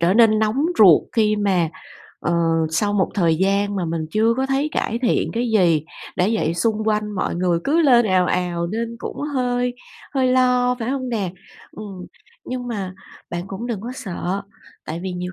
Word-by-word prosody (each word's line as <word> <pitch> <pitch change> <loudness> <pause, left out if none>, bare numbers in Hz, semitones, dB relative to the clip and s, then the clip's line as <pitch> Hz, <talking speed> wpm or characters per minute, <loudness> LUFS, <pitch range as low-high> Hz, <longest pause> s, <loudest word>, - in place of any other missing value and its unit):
trở 175 +3 +3
nên 225 -2 +5
nóng 220 +7 +1
ruột 185 -8 +8
khi 215 -2 +2
mà, 190 -5 +1 0.5
ờ, 175 - -1 0.4
sau 205 +6 +1
một 195 -2 +1
thời 170 -5 +2
gian 200 +3 +1
mà 180 - -1
mình 160 -1 -2
chưa 225 +5 +2
có 265 +1 0
thấy 270 +2 0
cải 230 -4 -1
thiện 240 - +1
cái 235 +1 -1
gì, 170 -8 +3 0.3
đã 180 +3 +2
vậy 170 -7 0
xung 220 +4 0
quanh 210 -1 0
mọi 185 - -1
người 175 -1 +1
cứ 315 +4 +3
lên 240 -6 +5
ào 185 -2 +3
ào 175 -1 -1
nên 230 +5 -3
cũng - - -6 0.2
hơi 245 -1 0 0.4
hơi 260 -2 +2
lo, 250 -1 +3
phải 230 +2 -2
hông 265 -2 -2
nè? 210 -7 -2 0.4
Ừm. 195 -4 -9 0.4
Nhưng 250 -1 -5
mà 195 -5 -4 0.4
bạn 175 0 -3
cũng 195 +5 -6
đừng 230 -5 -3
có 240 +4 -6
sợ, 195 -3 -4 0.4
tại 165 +2 -5
vì 185 -1 -3
nhiều 180 0 -5
210 Hz, 190 wpm, -21 LUFS, 180-240 Hz, 0.5 s, ruột